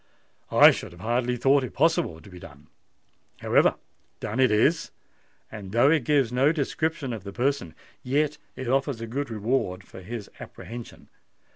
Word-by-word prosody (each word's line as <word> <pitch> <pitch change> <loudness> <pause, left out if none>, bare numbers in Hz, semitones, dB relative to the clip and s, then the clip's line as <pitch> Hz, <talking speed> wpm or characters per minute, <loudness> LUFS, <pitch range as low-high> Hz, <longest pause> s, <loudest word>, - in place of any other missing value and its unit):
I - - +8
should - - -6
have 85 - -14
hardly 125 +3 0
thought 135 +3 +3
it 130 - -7
possible 165 - +1
to 100 - -15
be 90 - -11
done. 75 -2 -14 0.7
However, - - +3 0.4
done 110 +5 -4
it 130 - +5
is—and, 105 - -3
though 120 +5 +5
it 155 -7 +2
gives 140 -5 +2
no 130 +4 +3
description 155 -2 -2
of 110 -5 -7
the 100 - -7
person, 125 - -1 0.3
yet 145 +3 0 0.2
it 130 - -6
offers 135 -1 0
a 115 - -5
good 135 +5 -4
reward 105 -4 -1
for 95 - -12
his 105 +2 -7
apprehension. 120 0 -10
125 Hz, 160 wpm, -26 LUFS, 105-140 Hz, 0.7 s, I